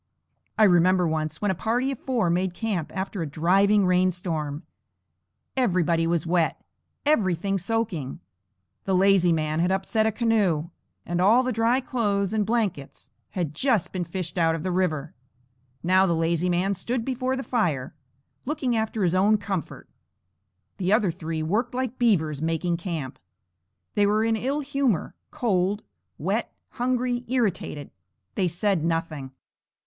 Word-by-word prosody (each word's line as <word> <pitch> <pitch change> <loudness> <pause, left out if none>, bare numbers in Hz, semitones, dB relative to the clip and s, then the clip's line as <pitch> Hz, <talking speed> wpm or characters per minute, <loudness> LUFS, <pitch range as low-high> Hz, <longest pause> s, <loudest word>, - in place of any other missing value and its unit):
I 220 - +5
remember 180 -1 +4
once 155 -1 -2
when 205 - +2
a - - +1
party 240 +8 0
of 270 - -6
four 235 -10 0
made 180 +1 0
camp 195 -6 -2
after 190 0 -3
a 160 - -2
driving 195 +7 +3
rain 180 0 +3
storm. 160 -4 -3 0.9
Everybody 175 -9 +2
was 170 -1 0
wet; 170 -1 +1 0.5
everything 195 - +1
soaking. 190 - -2 0.7
The 190 - +1
lazy 190 -2 +4
man 155 -1 0
had 175 +2 +2
upset 205 +3 +1
a - - +2
canoe, 200 -8 +1 0.3
and 175 +1 -1
all 225 +7 +5
the 255 - -1
dry 230 +3 +2
clothes 205 -6 -1
and 210 -2 0
blankets 210 - -2 0.3
had 165 -5 -1
just 230 - +1
been 185 -2 -1
fished 175 +1 -4
out 165 -1 +3
of 165 - -5
the 185 - -1
river. 160 -5 -1 0.7
Now 185 +2 +4
the 170 - +1
lazy 165 +2 +1
man 180 +3 +1
stood 230 +5 -3
before 260 0 -1
the 265 - -4
fire, 165 - -1 0.5
looking 270 -4 -1
after 220 -1 -1
his 175 -1 +2
own 200 +4 +4
comfort. 195 -6 -5 0.9
The 185 0 -1
other 210 -4 +3
three 160 -2 -4
worked 225 +10 -1
like 255 -1 -3
beavers, 160 - +2
making 165 +1 0
camp. 165 -7 -5 0.7
They 205 -1 +3
were 215 +2 +2
in 225 0 +2
ill 270 +6 -1
humor, 270 - 0 0.2
cold, 200 -2 0 0.3
wet, - - -1 0.2
hungry, 245 -1 -1
irritated. 205 - -1 0.4
They 185 - +1
said 180 0 0
nothing. 165 -4 -2
190 Hz, 150 wpm, -25 LUFS, 170-225 Hz, 0.9 s, I